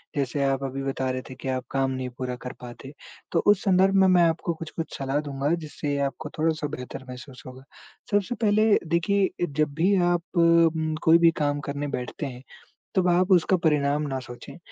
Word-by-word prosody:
जैसे 140 0 -1
आप 135 0 0
अभी 135 0 -4
बता 135 -1 -2
रहे 130 0 -3
थे 130 - -8
कि - - -6
आप 130 -1 -2
काम 135 -1 0
नहीं 130 -1 -4
पूरा 125 -1 -3
कर 125 - -5
पाते, 125 +3 -10 0.4
तो 170 - +2
उस 205 -2 +5
संदर्भ 190 0 +3
में 190 - +6
मैं 180 -2 +5
आपको 165 +1 0
कुछ-कुछ 165 0 -7
सलाह 135 +1 -1
दूँगा 140 +3 -1
जिससे 145 -1 -3
आपको 150 +1 -9
थोड़ा-सा 155 -1 0
बेहतर 130 +1 -8
महसूस 125 +1 -10
होगा। 130 +1 -11 0.5
सबसे 205 +4 +1
पहले 215 0 +2 0.2
देखिए, 185 +4 +1 0.2
जब 150 0 -1
भी 185 +6 +2 0.2
आप 175 -1 +1 0.2
उम, 165 -2 +3
कोई 165 0 +6
भी 170 -1 +5
काम 145 0 0
करने 145 +1 -3
बैठते 125 +4 -5
हैं, 125 -1 -8 0.5
तब 185 -1 +3
आप 180 +2 +2
उसका 180 +1 +4
परिणाम 145 -1 +1
ना 135 -1 -3
सोचें, 120 +7 -10
150 Hz, 190 wpm, -25 LUFS, 135-170 Hz, 0.5 s, में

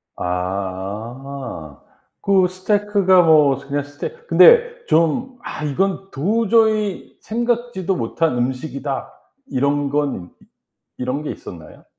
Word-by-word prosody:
아. 95 - -5 0.4
그 195 -2 +3
스테이크가 195 0 +2
뭐 150 -5 +5
그냥 140 +1 -3
스테 145 - -6 0.2
근데 480 0 +6
좀 245 +12 +1
'아 - - -6
이건 190 +6 -1
도저히 215 +4 +1
생각지도 235 -5 -1
못한 130 +3 -1
음식이다.' 130 +2 -3 0.4
이런 140 - 0
건 140 -10 -1
이 - - -23 0.5
이런 125 +3 -2
게 150 - -3
있었나요? 80 -3 -11
150 Hz, 210 characters per minute, -20 LUFS, 130-200 Hz, 0.5 s, 근데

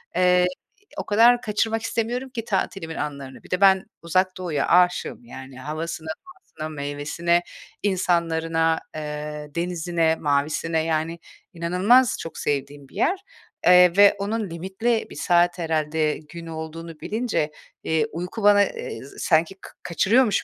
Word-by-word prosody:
eee, 180 0 +4 0.5
o - - -3
kadar 235 +3 +5
kaçırmak 220 +1 0
istemiyorum 240 +3 -2
ki 230 -3 -6
tatilimin 190 -4 -2
anlarını. 140 -3 -6
Bir - - -16
de 180 +2 0
ben 190 -1 +5 0.2
Uzak 185 +3 +1
Doğu’ya 160 -6 -1
aşığım 180 -7 +2
yani 130 +1 -10
havasına, 160 +3 -5 0.2
doğasına, 365 - -9
meyvesine, 150 +4 -1 0.4
insanlarına, 165 -4 +1 0.2
eee, 150 0 -5
denizine, 170 -1 0
mavisine 155 +2 0
yani 165 +1 -1 0.3
inanılmaz 185 +9 +3
çok 165 - -7
sevdiğim 140 0 -3
bir - - -19
yer, 375 +2 +1 0.5
eee, 180 -1 +8
ve 205 0 +7
onun 210 -1 -2
limitli 190 +7 -1
bir - - -11
saat 175 0 +2
herhâlde 155 -1 0
gün 165 +2 -11
olduğunu 160 0 -7
bilince, 215 -9 -1 0.3
eee, 160 -2 +1
uyku 180 +6 -5
bana, 205 0 +6
eee, 115 - -6 0.2
sanki 165 +3 +2
ka - - -11
kaçırıyormuş 215 +6 +2
170 Hz, 130 wpm, -24 LUFS, 155-195 Hz, 0.5 s, eee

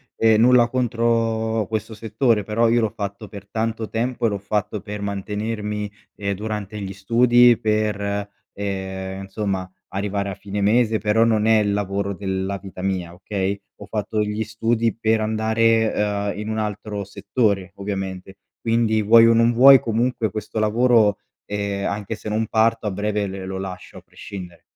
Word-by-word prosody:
ehm, 110 -1 +4
nulla 120 0 +5
contro 115 -2 0
questo 110 0 -3
settore, 110 0 0
però 115 +2 +2
io 120 +1 +3
l'ho 110 -3 0
fatto 100 +1 -5
per 100 -1 -11
tanto 110 0 -2
tempo 120 +1 -1
e - - +4
l'ho 100 - -2
fatto 105 +1 -2
per 105 0 -7
mantenermi, 105 +1 -3 0.2
ehm, 100 -1 -2
durante 105 0 -5
gli 95 -1 -5
studi, 120 +4 +5
per, 105 -2 -1 0.2
ehm, 95 -1 -4
insomma 95 -2 -3 0.2
arrivare 100 0 -2
a 95 - -5
fine 100 0 -5
mese, 110 +2 +3
però 105 +2 +3
non 110 -2 +2
è 110 0 +5
il 105 -1 +1
lavoro 100 0 -2
della 95 0 -3
vita 95 -1 -10
mia, 95 -3 -2
okay. 100 +1 -3 0.2
Ho - - -7
fatto 105 0 -2
gli 105 +1 -2
studi 115 0 0
per 110 0 +2
andare, 110 +1 +2
ehm, 105 -1 -1
in 105 - -5
un 110 0 -2
altro 105 -1 -3
settore 100 -1 -1
ovviamente. 95 -1 -5 0.2
Quindi 115 -1 +2
vuoi 115 +2 +7
o 115 - +5
non 115 +1 +4
vuoi 130 +2 +8
comunque 115 -1 0
questo 110 +1 -6
lavoro, 110 -1 +3 0.3
ehm, 100 -1 -2
anche 100 +1 -3
se 110 0 -7
non 110 +1 0
parto 115 +1 +2
a 105 - 0
breve 105 +1 -1
l 95 -1 -6
lo 95 0 -4
lascio 95 -1 -7
a - - -10
prescindere. 90 -4 -10
105 Hz, 165 wpm, -22 LUFS, 100-115 Hz, 0.3 s, vuoi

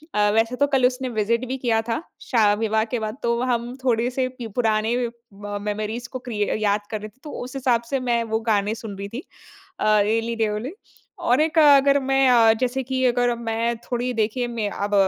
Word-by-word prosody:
अ, 210 0 +3
वैसे 225 +2 +2
तो 285 - +5
कल 255 -2 +4
उसने 255 0 -4
विज़िट 235 +4 +1
भी 265 +2 -3
किया 230 -3 +1
था, 230 +7 -1 0.2
शा 215 -5 +3
विवाह 220 0 +1
के 240 - +1
बाद। 215 +4 -5
तो 235 0 +1
हम 240 +1 -2
थोड़े 240 -1 +2
से 255 - +2
पि 235 - -5
पुराने 220 0 +1 0.4
म 205 +1 -6
मेमरीज़ 215 +3 -3
को 255 - -3
क्रिय 210 -2 0 0.2
याद 205 0 +2
कर 215 - -2
रहे 215 - -7
थे, 260 - -33
तो 300 - -8
उस 255 +2 -9
हिसाब 250 -3 +1
से 270 - +2
मैं 240 -2 0
वो - - +2
गाने 205 +1 +1
सुन 215 -3 -8
रही 200 +1 -5
थी 250 +8 -6 0.6
अ, - - -1 0.2
एली 225 +2 0
रे 225 -1 +1
एली। 260 - -5 0.5
और 260 -3 +3
एक, 315 0 0
अगर 280 -1 +6
मैं 270 0 +3
अ, 230 -2 +6
जैसे 255 +1 0
कि 260 +1 -2
अगर 245 -1 +2
मैं 230 0 -1
थोड़ी, 245 +1 -3
देखिए, 225 +2 -1
मैं 230 -3 -2
अब 205 +1 -3
235 Hz, 215 wpm, -23 LUFS, 220-255 Hz, 0.6 s, अगर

